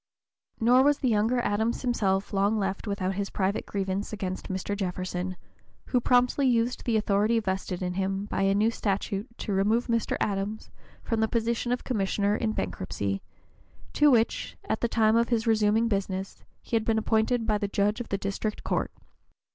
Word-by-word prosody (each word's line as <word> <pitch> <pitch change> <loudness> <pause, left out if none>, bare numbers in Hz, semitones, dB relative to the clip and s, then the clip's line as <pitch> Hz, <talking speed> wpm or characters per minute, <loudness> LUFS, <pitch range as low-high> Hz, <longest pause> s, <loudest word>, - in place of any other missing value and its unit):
Nor 245 +3 +5
was 290 +1 +4
the 260 - 0
younger 225 +3 +2
Adams 220 +3 0
himself 200 -6 0
long 200 +2 +2
left 195 +1 -2
without 195 -2 -1
his 200 +1 -3
private 195 +1 -1
grievance 195 0 -2
against 190 -3 -4
Mr. 190 +2 -2
Jefferson, 185 -1 -3 0.5
who 250 - +2
promptly 250 +3 +3
used 240 0 +1
the 230 -2 +2
authority 210 +2 +2
vested 190 -3 -3
in 180 0 -2
him 195 +1 -1
by 205 - -2
a 195 0 +3
new 215 +3 +3
statute 200 0 -2
to 205 - -3
remove 215 +5 +2
Mr. 230 -2 0
Adams 205 +2 -2 0.3
from 225 - -1
the 220 - +3
position 235 +1 -1
of 245 - -1
commissioner 205 -3 0
in 220 0 0
bankruptcy, 95 - -3 0.7
to 295 0 +5
which, 235 -4 +1
at - - -1
the 235 - +2
time 220 -1 +3
of 235 0 +3
his 230 -2 +1
resuming 220 0 +3
business, 195 -2 -3 0.2
he - - -3
had 225 - +2
been 220 0 +1
appointed 220 +2 +1
by 215 -2 +1
the 205 - -1
judge 205 +3 0
of 240 - -8
the 195 - 0
district 200 +2 -3
court. - - -1
210 Hz, 180 wpm, -27 LUFS, 195-230 Hz, 0.7 s, Nor